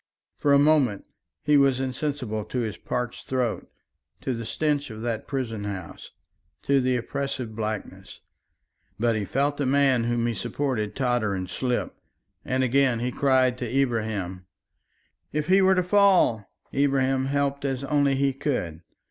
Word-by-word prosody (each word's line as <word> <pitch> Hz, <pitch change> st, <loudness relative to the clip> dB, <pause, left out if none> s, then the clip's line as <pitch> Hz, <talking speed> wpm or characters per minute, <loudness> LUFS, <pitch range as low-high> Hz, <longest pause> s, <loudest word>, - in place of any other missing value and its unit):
For 145 Hz, -, +1 dB
a 140 Hz, -, +7 dB
moment 140 Hz, -8 st, +3 dB, 0.4 s
he 150 Hz, -1 st, +4 dB
was 135 Hz, -2 st, +3 dB
insensible 130 Hz, -4 st, -3 dB
to 125 Hz, -, -2 dB
his 110 Hz, -3 st, -3 dB
parched 125 Hz, -1 st, -4 dB
throat, 125 Hz, -4 st, -1 dB, 0.5 s
to 130 Hz, -, -2 dB
the 115 Hz, -1 st, -5 dB
stench 145 Hz, +1 st, -1 dB
of 110 Hz, 0 st, -8 dB
that 115 Hz, -2 st, -3 dB
prison 115 Hz, -7 st, -3 dB
house, 95 Hz, -5 st, -7 dB, 0.5 s
to 140 Hz, -1 st, +3 dB
the 130 Hz, 0 st, +1 dB
oppressive 125 Hz, -2 st, -4 dB
blackness. 110 Hz, -1 st, -5 dB, 0.8 s
But 115 Hz, +1 st, +1 dB
he 105 Hz, -2 st, -2 dB
felt 140 Hz, +6 st, 0 dB
the 140 Hz, -, 0 dB
man 135 Hz, -3 st, +3 dB
whom 120 Hz, 0 st, 0 dB
he 120 Hz, -, 0 dB
supported 120 Hz, -3 st, -2 dB
totter 120 Hz, -6 st, 0 dB
and 95 Hz, -1 st, -4 dB
slip, 125 Hz, +7 st, -2 dB, 0.5 s
and 130 Hz, +1 st, 0 dB
again 130 Hz, -1 st, +3 dB
he 125 Hz, +1 st, -1 dB
cried 130 Hz, -2 st, +2 dB
to 120 Hz, -3 st, -4 dB
Ibrahim: 110 Hz, -8 st, -2 dB, 0.8 s
"If 150 Hz, +2 st, -2 dB
he 190 Hz, +1 st, +6 dB
were 190 Hz, 0 st, +5 dB
to 185 Hz, -, +2 dB
fall!" 180 Hz, -, +3 dB, 0.2 s
Ibrahim 135 Hz, -1 st, +2 dB
helped 140 Hz, 0 st, -1 dB
as 135 Hz, -1 st, -2 dB
only 140 Hz, -1 st, +2 dB
he 135 Hz, 0 st, +1 dB
could. 125 Hz, -, -3 dB
130 Hz, 155 wpm, -25 LUFS, 115-140 Hz, 0.8 s, a